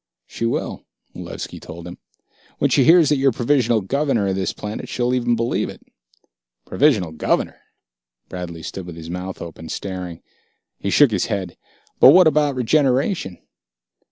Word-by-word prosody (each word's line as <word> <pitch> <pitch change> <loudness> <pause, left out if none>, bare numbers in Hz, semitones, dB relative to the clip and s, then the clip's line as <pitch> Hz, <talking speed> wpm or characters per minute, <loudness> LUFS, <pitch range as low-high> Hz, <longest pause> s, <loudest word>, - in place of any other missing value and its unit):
"She 115 - -3
will," - - -3 0.3
Malevski - - -7
told 85 +1 -10
him. 90 0 -9 0.6
"When - - +1
she - - +4
hears 165 -2 +6
that 150 - +3
you're 135 0 +3
Provisional 120 -2 +1
Governor 125 -2 0
of 95 - -1
this 95 -1 -1
planet, 105 +1 -7
she'll 125 0 -1
even 120 -1 +1
believe 115 +1 -1
it." - - -12 0.8
"Provisional 110 - +2
Governor?" 80 - -1 0.7
Bradley 85 -3 -7
stood 95 -2 -7
with 85 - -8
his 80 0 -8
mouth 90 +1 -6
open, 80 -1 -10
staring. 90 -3 -6 0.6
He 100 - -2
shook 140 +4 +5
his 100 -4 0
head. 100 -5 -3 0.4
"But 135 - +9
what 185 +1 +7
about 150 -2 +2
regeneration...?" 130 - +1
115 Hz, 155 wpm, -21 LUFS, 90-135 Hz, 0.8 s, But